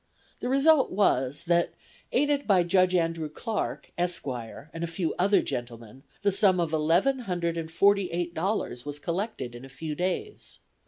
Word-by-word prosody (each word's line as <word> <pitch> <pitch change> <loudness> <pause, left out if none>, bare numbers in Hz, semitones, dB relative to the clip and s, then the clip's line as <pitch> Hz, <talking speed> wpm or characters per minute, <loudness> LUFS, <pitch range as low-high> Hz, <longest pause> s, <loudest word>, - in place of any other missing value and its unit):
The 245 - -3
result 275 +2 +4
was 145 -8 +1
that, 170 0 +1 0.4
aided 290 -1 +1
by 190 -4 +5
Judge 185 +1 +3
Andrew 165 -2 0
Clarke, 220 +7 -4
Esq., 175 0 0
and 135 +6 -6
a - - -1
few 165 0 -2
other 200 +3 +4
gentlemen, 120 0 -6 0.2
the 200 - +3
sum 195 -2 +4
of 165 -2 -1
eleven 170 - +2
hundred 175 -7 -2
and 165 -1 -4
forty 200 +3 +3
eight 175 0 -3
dollars 170 - -2
was 145 0 -6
collected 170 - -3
in 120 +1 -10
a 135 - -10
few 150 +4 -5
days. 185 - -3
175 Hz, 165 wpm, -27 LUFS, 155-200 Hz, 0.4 s, by